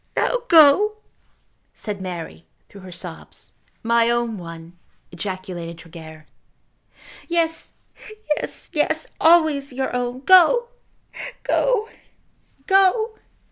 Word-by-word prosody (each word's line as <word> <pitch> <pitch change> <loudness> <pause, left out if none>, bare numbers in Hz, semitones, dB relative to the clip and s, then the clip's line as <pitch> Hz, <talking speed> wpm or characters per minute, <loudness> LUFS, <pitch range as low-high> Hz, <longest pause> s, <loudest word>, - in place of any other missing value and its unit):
"Now - - +1
go," 340 - +6 0.8
said 205 -3 -5
Mary, 175 -2 -7 0.2
through 200 - -13
her 185 -1 -11
sobs. 175 -1 -9 0.3
"My 230 0 +3
own 235 -3 -1
one," 165 0 -11 0.3
ejaculated 180 -2 -6
Tregear. 160 -2 -12 1.0
"Yes, 330 -1 -1 0.6
yes, - - -8
yes; - - 0
always 315 -4 +4
your 260 0 -3
own. 245 +1 -3
Go, 375 - +5 0.7
go; 480 -4 +1 0.8
go." 390 +4 +3
240 Hz, 95 wpm, -21 LUFS, -, 1.0 s, go